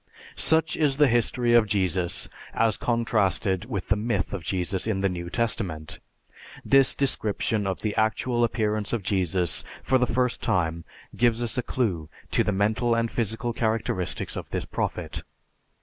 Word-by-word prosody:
Such 160 -1 +3
is 145 -3 +1
the 145 -1 +5
history 120 0 +2
of 115 -2 +5
Jesus 95 -3 +1 0.3
as 110 -2 +2
contrasted 105 -5 0
with 105 -6 -5
the 105 - +4
myth 115 +3 -2
of 95 -4 -4
Jesus 95 +4 -1
in 100 -3 0
the 100 - +3
New 85 -1 -5
Testament. 90 -9 -2 0.7
This 135 -1 +4
description 110 -5 0
of 95 - -3
the 105 -2 -2
actual 120 +2 +1
appearance 110 -2 -1
of 115 -4 -1
Jesus 90 -2 0 0.2
for 130 - +2
the 125 - +2
first 125 0 0
time 85 -2 0 0.3
gives 120 0 +2
us 120 - -1
a 125 - +1
clue 95 -12 -2 0.2
to - - +3
the - - 0
mental 110 +4 +1
and 115 0 0
physical 115 +1 -2
characteristics 110 -6 -1
of - - -6
this - - -3
Prophet. - - -3
110 Hz, 160 wpm, -25 LUFS, 95-120 Hz, 0.7 s, the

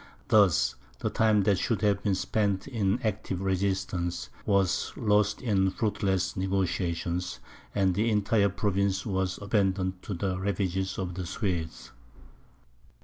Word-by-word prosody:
Thus, 85 - +4 0.2
the - - -2
time 110 -2 +3
that 100 -2 +2
should 115 +1 -1
have 100 -1 +2
been 100 -2 +1
spent 100 +1 0
in 110 -4 0
active 100 -4 -2
resistance, 95 -2 -1 0.2
was 100 -3 +2
lost 105 0 +2
in 95 -5 +2
fruitless 95 -4 -1
negociation, 90 -2 -1 0.5
and 95 -2 +3
the 110 +5 +1
entire 105 -1 +2
province 100 -1 0
was 95 -3 -1
abandoned 95 -3 0
to 100 - -5
the 90 +1 -2
ravages 95 -1 -1
of 90 -2 -3
the 90 0 -5
Swedes. 85 - -3
95 Hz, 130 wpm, -28 LUFS, 95-105 Hz, 0.5 s, Thus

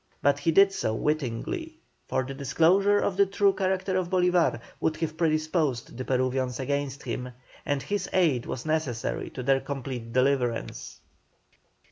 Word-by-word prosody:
But 145 0 +3
he 165 +3 +1
did 195 +4 +6
so 110 -12 -1
wittingly, 155 - -2 0.3
for 130 - 0
the 135 +2 -6
disclosure 170 - +3
of 195 -2 0
the 200 0 +5
true 200 0 +3
character 190 0 -1
of 180 -2 -1
Bolívar 180 -2 +2 0.2
would 155 -1 0
have 160 -1 -3
predisposed 155 -5 0
the 130 - -4
Peruvians 130 -1 0
against 140 +1 -2
him, 125 0 -4 0.4
and 145 -1 0
his 200 -2 -2
aid 155 -10 +2
was 115 - -5
necessary 155 -7 -2
to 130 - -7
their 135 +1 +3
complete 130 -4 -5
deliverance. 125 - -1
150 Hz, 150 wpm, -27 LUFS, 130-185 Hz, 0.4 s, did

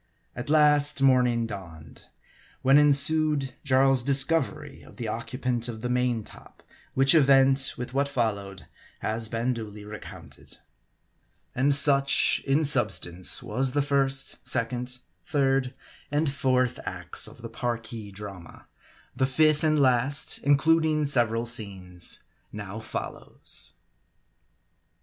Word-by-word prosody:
At 120 +4 -7
last, 150 -2 +3
morning 125 -3 +2
dawned; 90 -8 -11 0.6
when 135 +2 +5
ensued 150 -1 +4
Jarl's 135 -1 +3
discovery 145 +2 -1
as - - -17
the 115 - -6
occupant 120 +2 -3
of 110 -2 -7
the 125 - -4
main 125 -2 -1
top; - - -16 0.3
which 135 +1 +5
event, 135 -3 +3
with 125 +1 -7
what 140 +1 0
followed, 100 -7 -4 0.4
has 110 0 -3
been 115 +2 -2
duly 105 -3 -9
recounted. 105 0 -12 1.0
And 140 +3 +2
such, 140 -1 +3
in 140 +4 +2
substance, 100 - +3
was 130 +4 -2
the 145 -1 +1
first, 135 -1 0
second, 125 +1 -3 0.3
third 135 -2 0 0.4
and 145 -1 -1
fourth 130 -3 0
acts - - 0
of - - -14
the 115 - -7
Parki 115 -3 -6
drama. 95 -4 -11 0.5
The 130 - 0
fifth 155 +2 +1
and 155 -1 +2
last, 130 +1 +1
includ 155 +3 +3
ing 155 -1 0
several 120 -4 +1
scenes, 95 -7 -2 0.3
now 105 0 -8
follows. 110 - -4
130 Hz, 120 wpm, -25 LUFS, 115-140 Hz, 1.0 s, when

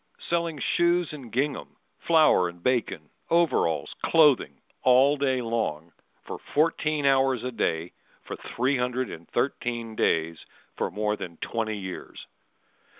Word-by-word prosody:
Selling 170 -2 0
shoes 175 +2 +1
and 130 -6 -9
gingham, 140 +3 -2 0.3
Flour 155 - +5
and 85 0 -14
bacon, 125 -3 -1 0.2
overalls, 155 - +1
clothing, 145 - +3 0.2
all 130 +3 +5
day 130 -3 0
long 95 -9 -2 0.3
For - - -7
fourteen 155 -1 0
hours 135 -3 +3
a 125 - -3
day 85 -7 -2 0.3
for - - -6
three 130 +3 -1
hundred 125 +1 -1
and 80 - -11
thirteen 120 -3 -2
days 80 -4 0 0.4
For - - -2
more 105 +2 -1
than 85 -5 -8
twenty 110 -2 -3
years. 95 -2 -8
125 Hz, 130 wpm, -26 LUFS, 105-145 Hz, 0.4 s, Flour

